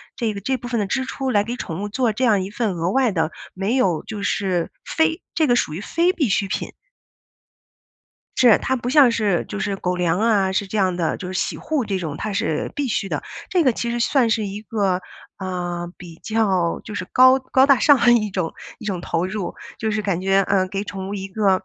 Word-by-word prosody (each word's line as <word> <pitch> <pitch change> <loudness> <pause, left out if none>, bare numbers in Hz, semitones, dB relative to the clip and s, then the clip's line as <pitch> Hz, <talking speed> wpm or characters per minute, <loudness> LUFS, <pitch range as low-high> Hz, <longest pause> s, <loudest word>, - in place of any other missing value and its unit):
这 225 -3 -1
个 200 - -6
这 265 +6 0
部 245 - -8
分 235 -2 -1
的 205 - 0
支 260 +7 -1
出 265 0 -3
来 205 -2 +3
给 240 +3 -4
宠 175 -5 -5
物 205 - -3
做 235 0 0
这 255 +5 -2
样 205 -5 +3
一 195 - -6
份 215 -3 -1
额 170 +2 -1
外 255 -1 +2
的 160 -3 0 0.2
没 195 +6 -1
有 185 -11 +1
就 215 -2 -6
是 185 -4 0
非 320 +2 0
这 315 -2 +2
个 245 - +4
属 155 - 0
于 170 - -4
非 340 +9 +1
必 285 - 0
需 195 +1 +1
品。 - - -4 1.6
是。 240 -4 +6
它 260 - -1
不 245 -1 -3
像 270 -3 +6
是 210 -6 0
就 210 - -5
是 200 0 -1
狗 180 -1 -2
粮 175 0 +1
啊， 210 -4 +2
是 195 +1 -1
这 215 - -3
样 185 -3 +2
的， 170 -2 -1
就 180 - -6
是 - - -6
洗 190 - -1
护 300 -6 -1
这 195 -2 -1
种， 155 -4 -4
它 215 - -3
是 160 -7 -1
必 285 -2 -1
须 200 -3 -1
的， - - -3 0.3
这 360 -2 +2
个 260 - +4
其 235 +1 -3
实 240 - -2
算 240 -1 +2
是 220 -1 +1
一 200 +1 -5
个 200 -4 -1 0.4
呃， 175 -2 -4
比 175 -2 -11
较 195 -6 +1
就 210 - -7
是 185 - -3
高 255 +1 +6
高 260 0 +3
大 275 -1 +5
上 290 -2 +6 0.2
一 215 -3 0
种 180 -4 -2 0.3
一 220 - -9
种 190 -4 -2
投 170 0 -1
入。 190 -1 -4 0.2
就 220 -1 -1
是 215 0 0
感 195 -4 -1
觉， 195 +1 +3
呃， 190 -1 +1
给 195 +1 -3
宠 195 -2 -6
物 - - -4
一 195 -1 -4
个 195 -1 +1
205 Hz, 250 characters per minute, -22 LUFS, 185-240 Hz, 1.6 s, 是